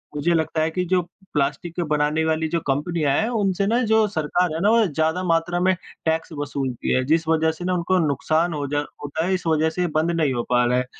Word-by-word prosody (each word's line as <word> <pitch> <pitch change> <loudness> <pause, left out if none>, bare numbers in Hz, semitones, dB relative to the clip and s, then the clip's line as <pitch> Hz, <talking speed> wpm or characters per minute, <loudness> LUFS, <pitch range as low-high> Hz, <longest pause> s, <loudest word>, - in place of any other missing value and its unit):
मुझे 170 +4 +1
लगता 160 -1 0
है 160 - +1
कि 180 +2 -1
जो 180 +1 +2 0.3
प्लास्टिक 150 +4 -1
को - - +1
बनाने 150 +1 +1
वाली 160 0 0
जो - - +2
कंपनियाँ 145 +1 0
हैं 220 - +1 0.2
उनसे 195 0 +1
ना 235 +3 +2
जो 220 -1 +4
सरकार 175 -1 0
है 160 - -3
ना 205 - +4
वो 230 -1 +4
ज़्यादा 160 +4 0
मात्रा 170 0 +1
में 185 - +5 0.3
टैक्स 160 +1 0
वसूलती 135 -4 -2
है। 130 - +2
जिस 160 +2 +1
वजह 160 0 +2
से 175 - -5
ना 185 - 0
उनको 180 +1 +1
नुकसान 155 +5 0
होजा 145 0 -2 0.2
होता 155 +3 -2
है, 190 - 0
इस 185 -2 -2
वजह 160 0 +2
से 170 +3 -4
ये 175 - +1
बंद 160 +2 +2
नहीं 155 -5 +1
हो 120 -1 -1
पा 125 0 +3
रहा 125 +1 +2
है। 125 - 0
160 Hz, 240 wpm, -22 LUFS, 150-175 Hz, 0.3 s, में